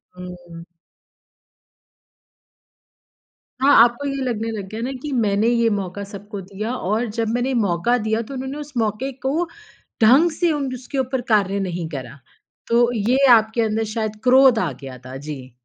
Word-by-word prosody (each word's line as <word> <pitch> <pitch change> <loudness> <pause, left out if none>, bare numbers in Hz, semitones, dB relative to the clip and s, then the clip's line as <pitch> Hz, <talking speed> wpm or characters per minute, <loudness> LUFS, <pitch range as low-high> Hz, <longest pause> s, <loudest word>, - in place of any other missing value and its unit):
हुँ। 175 -2 -10 3.0
हाँ 280 +2 +5
आपको 240 +4 0
ये 275 -1 -3
लगने 225 -3 -2
लग 205 -3 -5
गया 220 +2 -6
ना 250 +3 -2
कि 295 - -5
मैंने 215 -4 +1
ये 235 -1 +3
मौक़ा 195 +1 -5
सबको 200 0 -8
दिया 200 +5 -5
और 215 +1 -1
जब 230 -1 0
मैंने 245 +2 0
ये - - -1
मौक़ा 210 +2 +1
दिया 220 0 -1
तो 230 +4 -9
उन्होंने 265 +2 -5
उस 295 -1 -8
मौक़े 225 +4 -1
को 310 +6 +1 0.6
ढंग 265 +10 +6
से 340 +2 +1
उन 280 -4 -2
उसके 255 +2 -7
ऊपर 260 -1 -1
कार्य 200 -2 +2
नहीं 180 -3 -3
करा। 140 -2 -7 0.5
तो 240 +1 +3
ये 230 +3 +1 0.2
आपके 220 +1 +3
अंदर 220 0 0
शायद 215 -2 -3
क्रोध 260 -2 +6
आ 170 -5 -1
गया 135 -2 -8
था। 130 +1 -8
जी। 135 -2 -8
225 Hz, 165 wpm, -21 LUFS, 195-255 Hz, 3.0 s, ढंग